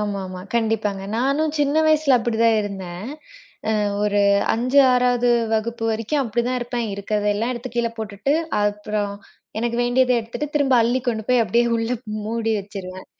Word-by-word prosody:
ஆமாமா. 195 -3 -4
கண்டிப்பாங்க. 220 -4 0
நானும் 280 +5 +1
சின்ன 290 +1 +1
வயதில் 305 -4 +4
அப்படித்தான் 230 -1 +2
இருந்தேன். 190 -1 -6 0.7
அ - - +1 0.2
ஒரு 205 -1 +2 0.3
5 255 +5 +1
6வது 245 -1 +2 0.2
வகுப்பு 225 +1 -1
வரைக்கும் 230 +6 -1
அப்படித்தான் 240 +2 -1
இருப்பேன். 240 -1 -3
இருக்கிறதெல்லாம் 210 +3 -1
எடுத்துக் 245 0 -7
கீழே 235 -1 +1
போட்டுட்டு 215 +5 -2 0.3
அப்புறம் 205 0 -1 0.4
எனக்கு 235 +1 -1
வேண்டியதை 250 +1 +3
எடுத்துட்டு 230 +6 -5
திரும்ப 275 -3 +3
அள்ளி 240 +3 +1
கொண்டு 220 -2 -1
போய் 250 -2 +4
அப்படியே 235 +2 +2
உள்ளே 230 +2 -1 0.3
மூடி 225 +1 -2
வைச்சிருவேன். 190 -2 -8
230 Hz, 140 wpm, -22 LUFS, 210-250 Hz, 0.7 s, வயதில்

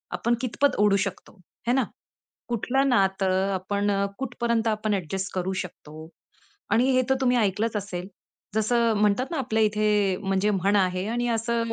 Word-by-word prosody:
आपण 235 +1 +1
कितपत 260 +3 +1
ओढू 205 -1 +4
शकतो, 195 +1 -8 0.3
हे 245 - +3
ना. 265 - +3 0.7
कुठलं 260 +4 +1
नातं 195 -4 +2
आपण 200 +2 -1
अ, 200 0 +1
कुठपर्यंत 235 -3 -1
आपण 215 -1 0
ॲड्जस्ट 190 +1 -3
करू 185 +1 -1
शकतो 155 -2 -11 0.6
आणि 250 +4 +3
हे 255 - +3
तर - - +5
तुम्ही 250 -1 +3
ऐकलंच 215 +1 0
असेल. 190 -3 -5 0.5
जसं 230 +1 +2
म्हणतात 210 +5 +2
ना 330 - -2
आपल्या 220 -4 0
इथे 210 -2 +2
म्हणजे 195 +1 +1
म्हण 200 +1 +1
आहे 185 0 +1
आणि 240 +1 -1
असं 230 0 -1
210 Hz, 160 wpm, -25 LUFS, 195-235 Hz, 0.7 s, तर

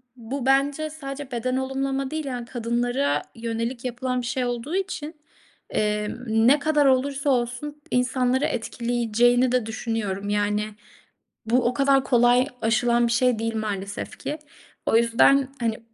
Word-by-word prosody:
bu 250 +2 -5
bence 280 +3 +2
sadece 280 -3 -7
beden 255 +1 -1
olumlama 270 +1 -2
değil, 315 -1 -3
yani 250 -3 -4
kadınlara 245 +3 0
yönelik 230 +2 -4
yapılan 250 +1 -2
bir - - -6
şey 260 0 -1
olduğu 245 +7 -3
için, 360 -5 -3 0.5
emm, 210 +3 -1 0.2
ne 285 +4 +6
kadar 295 0 +2
olursa 275 +2 +2
olsun 255 +4 -1
insanları 255 +2 +1
etkileyeceğini 240 +1 +1
de 250 -3 +1
düşünüyorum. 215 -3 -3
Yani 205 0 +1 0.8
bu, 240 +3 +2
o 240 - +2
kadar 275 +1 +3
kolay 245 0 +4
aşılan 235 +1 +2
bir - - -1
şey 240 -1 +2
değil 225 0 -2
maalesef 205 -2 -4
ki. 300 +2 -4 0.5
O - - +4
yüzden 245 +4 +4
hani 225 -2 -1
250 Hz, 140 wpm, -24 LUFS, 230-275 Hz, 0.8 s, ne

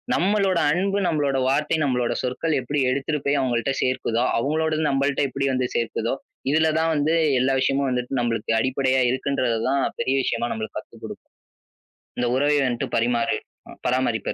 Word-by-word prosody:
நம்மளோட 195 -1 +2
அன்பு, 195 +4 0
நம்மளோட 145 -3 0
வார்த்தை, 150 +4 +1
நம்மளோட 125 -3 0
சொற்கள் 130 +6 -1
எப்படி 145 +4 -2
எடுத்துட்டு 140 +3 -1
போய் 140 0 +2
அவங்கள்ட 125 0 0
சேர்க்குதோ, 125 -2 0
அவங்களோடது 155 +4 0
நம்மள்ட்ட 140 +1 +1
எப்படி 135 +2 -2
வந்து 130 -1 0
சேர்க்குதோ? 115 0 -1 0.4
இதுல 160 +1 +3
தான் 165 0 +1
வந்து 150 +2 +1 0.3
எல்லா 130 +2 +2
விஷயமும் 135 0 +1
வந்துட்டு 125 +1 -2
நம்மளுக்கு 115 -2 -1
அடிப்படையா 130 +1 +1
இருக்குன்றதை 130 -3 0
தான் 140 0 +1 0.2
பெரிய 130 - +1
விஷயமா 120 0 -1
நம்மளுக்கு 110 -1 -5
கத்துக் - - -16
கொடுக்கும். - - -9 0.9
இந்த 125 - +1
உறவை 145 +2 +2
வந்துட்டு 120 -2 -2
பரிமாறு 120 0 +1 0.5
பராமரிப்பு 125 -3 0
135 Hz, 150 wpm, -23 LUFS, 125-150 Hz, 0.9 s, இதுல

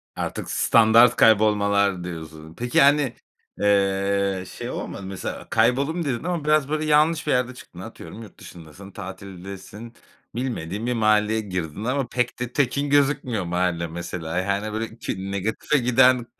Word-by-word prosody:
Artık - - -4
standart 115 +1 +5
kaybolmalar 100 -3 +3
diyorsun. 80 -2 -8
Peki, 120 +2 +2
hani, 140 -3 +4 0.5
eee, 100 -1 +1
şey - - -7
olmadı - - -6
mı 95 - -8
mesela? 95 -1 -6
Kayboldum 140 +9 +1
dedin 130 -1 -2
ama 175 -3 -2
biraz 150 -2 +2
böyle 155 0 -1
yanlış 155 +1 +3
bir - - +2
yerde 125 0 +1
çıktın. - - -14
Atıyorum 115 - -10
yurt 105 - -13
dışındasın, 90 +3 -12
tatildesin. 95 +3 -9 0.4
Bilmediğin 115 -5 -3
bir 125 - 0
mahalleye 110 -1 +2
girdin 90 -2 -5
ama 130 +1 -1
pek 125 -1 -2
de 125 0 -4
tekin 140 +1 0
gözükmüyor 135 -8 +1
mahalle 85 -1 -1
mesela. 85 0 -5
Yani 100 +3 -1
böyle 110 +1 -4
ki 95 0 -5
negatife 110 +9 -1
giden 125 0 +4
110 Hz, 145 wpm, -23 LUFS, 95-125 Hz, 0.5 s, standart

